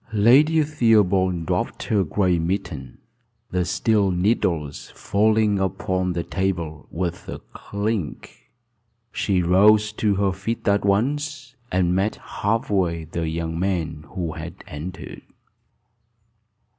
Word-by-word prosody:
Lady 140 +9 +5
Theobald 100 - +2
dropped - - -2
her 100 -3 +1
gray 90 +1 +1
mitten, 80 -7 -3 0.5
the 90 0 +1
steel 105 +2 +1
needles 90 -6 0
falling 105 0 +2
upon 95 -1 -1
the 85 0 -2
table 85 -6 -3
with 85 0 -4
a - - -4 0.2
clink. 100 -5 -4 0.6
She 95 -3 0
rose 105 +4 +5
to 105 -2 +1
her 100 0 +1
feet 95 +6 -4
at 100 0 +3
once, 135 +6 -1 0.2
and 90 -1 +2
met 95 +4 +1
half 110 +2 -2
way 85 -4 +1
the 80 +1 -3
young 80 0 -3
man 85 -5 -2
who 85 -4 -2
had 80 +2 -8
entered. 80 +5 -8
95 Hz, 120 wpm, -23 LUFS, 85-105 Hz, 0.6 s, Lady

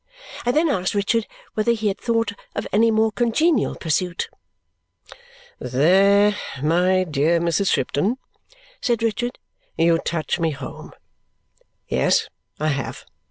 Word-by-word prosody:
I - - +4
then 310 +6 +2
asked 190 - -1
Richard 210 +2 +1 0.3
whether 220 +2 +2
he 220 -2 -2
had 195 - -1
thought 230 -3 0 0.2
of - - -3
any 225 +3 +4
more 220 0 +2
congenial 245 +5 +1
pursuit. 170 +2 -1 1.3
"There, 195 +10 +4 0.3
my 180 +4 +3
dear 160 +1 +1
Mrs. 170 +3 +1
Shipton," 185 - 0 0.6
said 235 -3 0
Richard, 240 +2 -1 0.4
"you 165 0 +3
touch 170 +1 -2
me 165 -1 +1
home. 135 -3 -8 0.9
Yes, - - +1 0.3
I 155 +1 +1
have. 140 -2 -4
195 Hz, 120 wpm, -22 LUFS, 165-230 Hz, 1.3 s, I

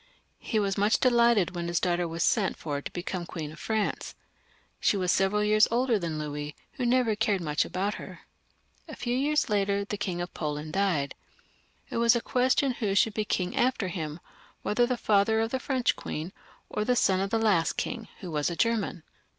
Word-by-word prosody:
He 220 - -2
was 200 -1 0
much 205 +2 +3
delighted 235 -7 +4
when 170 -1 -3
his 170 -1 +1
daughter 175 -1 0
was 165 0 -2
sent 210 -5 +2
for 145 -2 -3
to - - -7
become 180 0 -4
Queen 155 -4 -5
of 155 - -12
France. 220 -2 -2 0.6
She 205 - +2
was 180 -2 +1
several 195 +2 +2
years 215 0 +5
older 240 -1 +2
than 165 -3 -3
the 150 - -3
king, 150 0 -5 0.2
who 255 -5 -2
never 240 -3 +3
cared 210 -2 +1
much 150 -3 0
about 195 +3 -2
her. - - -10 0.7
A - - -8
few 240 0 -2
years 295 +3 +1
later 200 -2 +1
the 205 - -4
King 185 -4 -3
of 175 0 -4
Poland 150 0 -4
died. 180 -8 +1 0.8
It - - -2
was 235 +1 +5
a - - +2
question 255 +3 +2
who 210 -5 -1
should 220 +2 +3
be 215 0 -1
king 180 -3 -1
after 240 -6 +1
him, 160 -3 -5 0.4
whether 240 +3 +2
the 250 -1 -1
father 215 +1 +3
of 225 +1 0
the 260 - -1
French 260 -2 +1
queen, 165 +5 -5 0.3
or 210 - -2
the 250 +3 +2
son 190 -5 +3
of 195 +1 -1
the 225 - +1
last 205 -7 +2
king, 225 -2 -4
who 180 -4 -6
was 150 0 0
a 170 - -4
German. 220 -5 0
200 Hz, 205 wpm, -28 LUFS, 175-230 Hz, 0.8 s, years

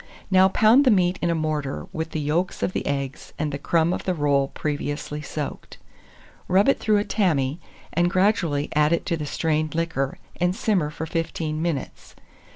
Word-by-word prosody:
Now 190 0 +6
pound 220 +7 +5
the 260 - +4
meat 185 -4 +3
in 175 - +1
a 170 - +1
mortar, 155 -3 -2
with 160 0 -3
the 160 - -3
yolks 160 +5 -1
of 185 - 0
the - - -3
eggs, 140 -1 -4
and 150 -1 -1
the 140 - -4
crumb 165 +3 +2
of - - -4
the 185 - 0
roll 140 -3 +2
previously 145 0 -4
soaked; 150 0 -6 0.7
rub 190 +3 +4
it 275 - +3
through 215 -1 +2
a 205 - +1
tammy, 160 -9 0 0.3
and 175 +1 +2
gradually 180 -6 +1
add 150 +2 +3
it 170 - 0
to 170 - 0
the 150 -2 -5
strained 155 0 -1
liquor, 160 -5 -1 0.2
and 180 +1 +1
simmer 205 -10 +1
for 155 +1 -5
15 160 -1 -3
minutes. 165 -5 -4
160 Hz, 185 wpm, -24 LUFS, 150-180 Hz, 0.7 s, Now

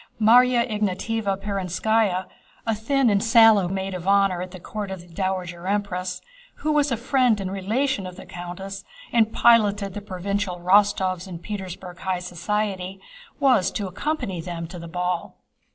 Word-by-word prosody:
Márya 240 +2 +5
Ignátevna 210 -1 -1
Perónskaya, 195 0 0 0.4
a 225 - +1
thin 255 +5 +1
and 200 0 +2
shallow 225 -4 +6
maid 190 +1 -3
of 180 0 -6
honor 195 -2 +3
at 185 - -5
the 185 0 -10
court 205 +3 -5
of 190 -2 -6
the 175 - -16
Dowager 180 -1 -3
Empress, 185 -3 -2 0.3
who 310 - -2
was 295 -2 +2
a 235 - +1
friend 250 -2 +2
and 190 -1 -3
relation 205 +3 -1
of 180 - -9
the 190 - -11
countess 180 +3 -7 0.3
and 225 -2 +4
piloted 205 -5 +4
the 205 - -5
provincial 200 -1 -3
Rostóvs 185 0 +2
in 180 -2 -6
Petersburg 185 -1 -7
high 185 -1 -1
society, 190 +2 -3 0.4
was 260 -10 +4
to 205 - -3
accompany 190 - -3
them 170 -1 -5
to 175 +2 -9
the 170 - -8
ball. 180 +1 -3
195 Hz, 160 wpm, -24 LUFS, 180-220 Hz, 0.4 s, shallow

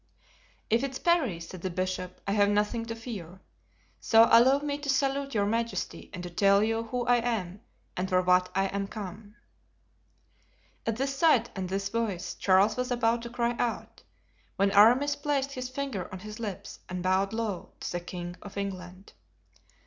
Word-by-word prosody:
"If 230 +3 +3
it's 270 -1 -3
Parry," 315 - +1
said 170 +1 -9
the 185 - -2
bishop, 185 0 -3
"I 200 - -1
have 205 0 +3
nothing 210 +3 0
to 230 - -4
fear; 195 -7 -8 0.6
so 225 0 +6
allow 250 +4 +7
me 285 0 -3
to 290 -1 -6
salute 275 0 0
your 200 -1 +2
majesty 230 +2 -2
and 180 -3 -7
to 175 - -5
tell 200 +3 +4
you 225 +1 0
who 245 +1 -3
I 245 0 +4
am 215 -5 -2 0.3
and 185 +1 -2
for 185 -1 +3
what 180 0 +3
I 195 0 +2
am 200 0 -2
come." 205 +1 -8 1.5
At 225 - +1
this 275 +1 -1
sight 275 -6 +3
and 185 -2 -3
this 195 +1 -2
voice 205 -5 -2
Charles 195 +4 +3
was 250 0 -1
about 235 -1 +1
to 235 - -7
cry 240 0 -1
out, 235 -2 -3 0.5
when 200 0 +2
Aramis 245 +8 +5
placed 285 -1 -1
his 255 -2 -5
finger 260 -8 -4
on 185 - -6
his 215 +4 -9
lips 200 -3 -6
and 180 0 -4
bowed 190 +2 +2
low 220 -5 -4
to - - -4
the 175 - -2
king 175 0 -7
of 205 -1 -10
England. 185 -1 -6
210 Hz, 180 wpm, -28 LUFS, 190-245 Hz, 1.5 s, allow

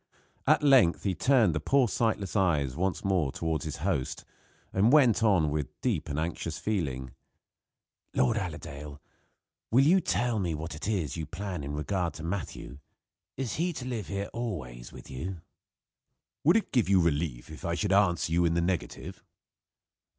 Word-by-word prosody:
At - - +4
length 130 -12 +5
he 95 - +1
turned 115 - +3
the 75 - -1
poor 130 - +3
sightless 110 -3 -1
eyes 75 -10 +2
once 95 +4 -1
more 90 -8 +1
toward 80 0 -2
his 75 - -4
host, 80 -10 -1 0.5
and 105 +5 +4
went 125 -7 +5
on, 95 -9 +3
with 75 -4 -4
deep - - -1
and 70 - -3
anxious 80 -1 -3
feeling: 75 - -2 1.0
"Lord 65 - +3
Allerdale, 70 +1 -6 0.7
will 130 +4 +5
you 185 +5 +5
tell 120 -7 0
me 85 -5 -1
what 80 +2 -5
is 90 -8 -1
your 80 -2 -4
plan 90 -2 -5
in 70 +1 -4
regard 85 +2 -2
to 80 - -8
Matthew. 85 -5 -5 0.6
Is 130 -3 -3
he 175 +2 0
to 130 - -6
live 120 -5 -4
here 100 0 -4
always 70 - -5
with - - -12
you?" 85 +7 -5 1.0
"Would 170 +8 +6
it 225 - -2
give 120 -7 +2
you 95 -1 +5
relief 75 -6 -1
if 80 - -10
I 85 - -1
should 100 +1 0
answer 90 -5 +3
you 85 +1 +3
in 85 -1 +2
the - - +2
negative?" 90 -1 -3
90 Hz, 165 wpm, -29 LUFS, 75-110 Hz, 1.0 s, Would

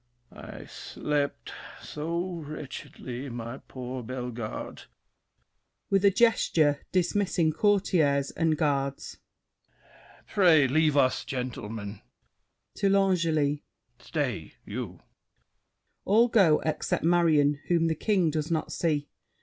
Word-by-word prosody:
I - - -10
slept 145 -1 -3 0.3
so 170 +4 -4
wretchedly, 140 -3 -7
my 120 +2 -6
poor 130 0 -7
Bellegarde. 125 -2 -6 1.1
[With 195 0 +3
a 200 - +7
gesture 170 -9 +3
dismissing 185 -3 +1
Courtiers 160 -9 +2
and 160 -2 +1
Guards. 140 -2 -1 1.1
Pray 170 -8 +5
leave 150 +2 +2
us, 130 -2 +3
gentlemen! 110 -5 -5 0.8
[To 200 - +2
L'Angely.] 165 -7 +2 0.4
Stay, - - -3
you! - - -6 1.0
[All 230 +5 +4
go 190 -10 +4
out - - -10
except 155 -1 -1
Marion, 160 -4 +3
whom 170 -2 +2
The 165 - +2
King 180 -1 +1
does 155 +1 -2
not 160 -2 -1
see. 150 -4 0
155 Hz, 100 wpm, -28 LUFS, 140-175 Hz, 1.1 s, a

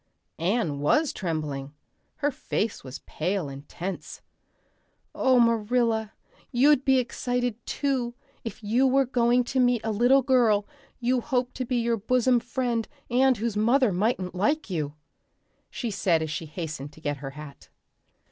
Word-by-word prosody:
Anne 170 -4 0
was 285 - +2
trembling. 150 -5 -4 0.4
Her 290 0 0
face 225 -4 -3
was 130 0 -8
pale 180 0 -2
and 140 +1 -10
tense. 185 +2 -6 0.9
"Oh, 260 -1 +3
Marilla, 230 -1 +2 0.4
you'd 270 +2 +4
be 265 -1 +4
excited, 245 -1 -2
too, 255 -4 -1 0.3
if 225 -1 -7
you 240 +6 +3
were 270 +1 +3
going 245 0 +2
to 260 +2 -2
meet 245 -2 +3
a 220 - -1
little 245 +5 +4
girl 235 -6 +3 0.3
you 250 0 +1
hoped 250 -2 -1
to 255 - -2
be 250 - -1
your 235 0 +1
bosom 250 +3 +2
friend 240 -2 -2 0.2
and 260 0 +4
whose 225 0 -2
mother 235 +3 +3
mightn't 190 -1 0
like 215 - 0
you," 150 -4 -2 0.7
she 235 -3 -4
said 175 -5 +1
as 155 - -4
she 160 0 -4
hastened 155 -3 -6
to - - -15
get 145 -2 -2
her 135 0 -6
hat. 150 -2 -11
230 Hz, 150 wpm, -26 LUFS, 180-250 Hz, 0.9 s, you'd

